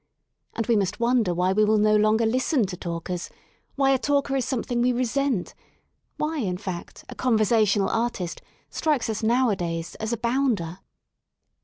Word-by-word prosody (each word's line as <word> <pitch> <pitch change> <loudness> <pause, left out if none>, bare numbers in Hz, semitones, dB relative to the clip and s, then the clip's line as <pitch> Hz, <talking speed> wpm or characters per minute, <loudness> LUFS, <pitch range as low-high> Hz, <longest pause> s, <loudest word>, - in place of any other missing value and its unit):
And 230 - -1
we 235 - +2
must 195 0 0
wonder 235 -5 +2
why 180 +2 +1
we 215 +2 +3
will 215 +1 +3
no 215 0 +4
longer 215 +2 +3
listen 255 +2 +1
to 185 -1 -5
talkers: 170 0 -5 0.5
why 275 -1 +3
a 265 - +3
talker 280 -1 0
is 260 -3 0
something 245 -2 -1
we 250 +1 +3
resent; 250 -3 -1 0.6
why, 310 0 -2
in 185 -7 -1
fact, 185 -3 -7
a - - -8
conversational 215 -4 +2
artist 225 -7 -2 0.3
strikes 295 -8 0
us 215 - -4
nowadays 195 -8 0
as 220 - -3
^* - - -1
a - - -1
bounder." 235 -8 -1
225 Hz, 165 wpm, -25 LUFS, 190-255 Hz, 0.6 s, no